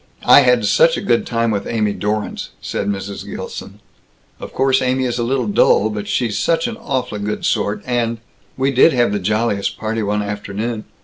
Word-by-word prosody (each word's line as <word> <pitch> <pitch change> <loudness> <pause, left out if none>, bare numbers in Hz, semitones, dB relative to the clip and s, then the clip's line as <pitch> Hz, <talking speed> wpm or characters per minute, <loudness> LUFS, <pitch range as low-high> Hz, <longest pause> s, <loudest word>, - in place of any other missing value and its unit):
"I - - +8
had 125 -5 +3
such 165 +10 +4
a - - -1
good 120 -1 +1
time 115 -1 0
with 100 -2 -2
Amy 105 -3 0
Dorrance," 105 +1 -3
said 100 - -4
Mrs. 100 0 -4
Gilson. - - -8 0.6
"Of - - -8
course 135 0 +2
Amy 130 +1 +1
is 125 -1 -2
a - - 0
little 125 +1 0
dull, 105 +1 +3
but 105 -1 -5
she's 105 0 -1
such 165 -1 +1
an 235 - -4
awfully 130 - -3
good 105 +1 -3
sort 105 0 0
and 120 -2 -1 0.4
We 135 +1 +1
did 135 +5 +5
have 120 -4 +2
the 105 - -1
jolliest 105 +1 -1
party 110 +1 -2
one 105 0 -1
afternoon. 105 +2 -4
115 Hz, 190 wpm, -18 LUFS, 105-125 Hz, 0.6 s, I